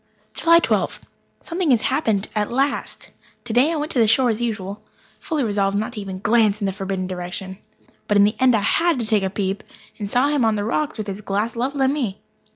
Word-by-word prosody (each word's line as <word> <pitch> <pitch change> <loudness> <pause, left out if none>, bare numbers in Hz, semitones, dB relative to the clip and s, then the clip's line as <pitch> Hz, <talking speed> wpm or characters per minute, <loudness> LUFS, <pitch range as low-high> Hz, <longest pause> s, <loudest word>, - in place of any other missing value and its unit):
July 335 0 +5
Twelfth. 335 - 0 0.4
Something 345 -1 -2
has 240 -4 +4
happened 215 -8 +1
at 210 0 -1
last. 275 +3 -1 0.3
Today 245 +6 +2
I - - -1
went 305 +1 -3
to 255 - 0
the 225 - +5
shore 245 +2 +4
as 220 +1 -3
usual, 210 -3 -3 0.4
fully 315 -7 -2
resolved 200 -2 0
not 220 +4 -3
even 200 -3 -5
to 185 - -9
glance 215 -2 +3
in 205 - -2
the 195 - 0
forbidden 190 -1 -3
direction. 185 +1 -6 0.5
But 205 - +3
in 200 - +7
the 210 +2 +2
end 255 -2 +5
I 215 - +1
had 335 +8 +2
to 235 - -2
take 215 -1 +2
a 190 - -1
peep, 195 0 -2 0.4
and 205 -2 -4
saw 255 +6 +2
him 290 -4 +1
on 220 -1 +3
the 205 -1 -2
rocks 300 +6 -1
with 215 - -3
his 200 0 -6
glass 210 +3 -2
levelled 270 +4 -1
at 265 - +3
me. 245 -9 -2
220 Hz, 225 wpm, -22 LUFS, 200-260 Hz, 0.5 s, in